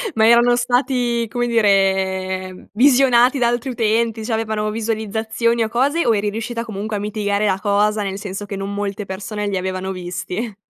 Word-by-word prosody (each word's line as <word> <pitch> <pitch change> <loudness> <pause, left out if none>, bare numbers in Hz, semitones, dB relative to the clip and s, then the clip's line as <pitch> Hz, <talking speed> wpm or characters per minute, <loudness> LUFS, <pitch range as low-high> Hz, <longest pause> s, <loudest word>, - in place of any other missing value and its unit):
Ma 220 - +4
erano 240 +1 +5
stati, 245 -1 0
come 240 +1 -2
dire, 190 -3 0
visionati 255 +1 +4
da 240 -2 +2
altri 240 +2 -1
utenti, 225 -1 0
c'avevano 220 -1 -1
visualizzazioni 225 +1 -1
o 220 - -2
cose, 280 +8 +1
o 230 - +3
eri 205 0 0
riuscita 230 +2 -4
comunque 215 -1 -5
a - - -2
mitigare 205 0 -1
la 190 -1 +1
cosa, 210 +1 +1
nel 195 -1 -3
senso 200 0 -6
che 200 - -6
non 195 +1 -4
molte 200 0 -3
persone 205 +2 -5
li 195 -2 -1
avevano 185 +1 -3
visti? 180 +4 -5
215 Hz, 170 wpm, -19 LUFS, 200-235 Hz, -, erano